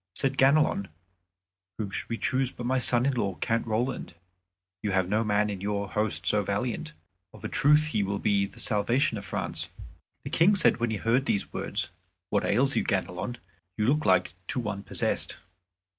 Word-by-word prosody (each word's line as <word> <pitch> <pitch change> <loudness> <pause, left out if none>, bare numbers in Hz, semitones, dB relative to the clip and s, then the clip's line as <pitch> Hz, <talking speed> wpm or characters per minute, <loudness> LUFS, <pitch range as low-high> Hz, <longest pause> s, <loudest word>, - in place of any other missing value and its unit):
Said 135 0 0
Ganelon, 135 -7 +3 0.9
"Whom 105 -3 -4
should - - -4
we 115 - -2
choose 130 +1 +1
but 120 - -8
my 130 +1 +1
son 120 0 +3
in 140 - +2
law, 100 -6 -1
Count 115 +4 -1
Roland? 115 -3 -2 0.7
You 105 -2 -1
have 95 -2 +2
no 105 +4 +1
man 105 -1 +2
in 95 -2 -6
your 100 0 -2
host 105 0 0
so 105 - +5
valiant. 100 -5 -3 0.4
Of - - -14
a - - -2
truth 150 +2 +3
he 110 - 0
will 100 0 -1
be 100 -1 +1
the - - -16
salvation 115 +5 +1
of 100 - -10
France." - - -3 0.5
The - - -6
King 190 +5 +4
said 185 - +4
when 120 0 0
he 110 - -1
heard 120 +6 +1
these 100 - -1
words, - - -2 0.4
"What - - +2
ails 135 +6 +2
you, - - +2
Ganelon? 95 +5 -2 0.4
You 105 - +1
look 150 +6 +2
like 90 -1 +3
to - - -2
one 105 -4 -3
possessed." - - -2
110 Hz, 190 wpm, -28 LUFS, 100-130 Hz, 0.9 s, so